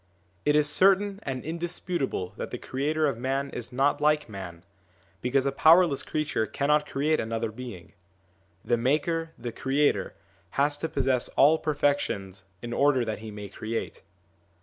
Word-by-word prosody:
It 150 - +3
is 150 -1 +4
certain 195 +5 +3
and 130 -2 -4
indisputable 170 - -3
that - - -5
the - - -5
creator 150 +4 -1
of 135 -6 -1
man 135 +2 -1
is 120 0 -6
not 135 +4 +1
like 150 -1 +2
man, 95 -5 -8 0.6
because 130 +2 +1
a 140 - +1
powerless 160 +1 +5
creature 150 -8 -1
cannot 150 +1 +1
create 150 +3 +1
another 115 0 -2
being. 110 -7 -9 0.7
The 120 - +2
maker, 155 +6 0
the 120 0 -5
creator, 140 +5 0 0.4
has 145 +1 +3
to 160 - -2
possess 135 -4 +1
all 155 +3 +6
perfections 140 - -1 0.2
in 120 0 -4
order 135 -2 +3
that 110 -2 -3
he 110 0 -8
may 105 -1 -7
create. 110 +3 -5
140 Hz, 150 wpm, -27 LUFS, 115-150 Hz, 0.7 s, all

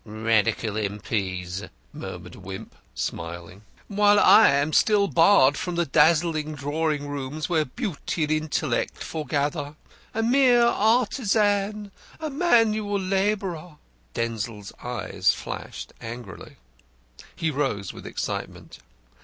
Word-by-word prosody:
"Radical 110 0 0
M.P.'s," 100 -3 -3 0.3
murmured - - -8
Wimp, - - -9 0.2
smiling. 85 +8 -5 0.3
"While 205 0 +4
I 220 - +7
am 145 +3 +1
still 205 -2 +4
barred 165 -6 +5
from 180 -1 -3
the 170 0 +1
dazzling 155 +1 +2
drawing 145 +1 -2
rooms, 145 +2 -4
where 160 -3 +1
beauty 175 - -3
and 150 - -1
intellect 155 -4 -1
foregather. 145 -1 -2 0.4
A 225 - 0
mere 245 0 +5
artisan! 210 -3 +1 0.3
A 310 -2 -4
manual 220 - +2
labourer!" 190 -4 -1 0.4
Denzil's 115 -3 -4
eyes 120 -4 0
flashed - - -7
angrily. 120 +1 -9 0.8
He 160 -1 -1
rose 130 -10 -2
with - - -10
excitement. - - -5
155 Hz, 105 wpm, -25 LUFS, -, 0.8 s, I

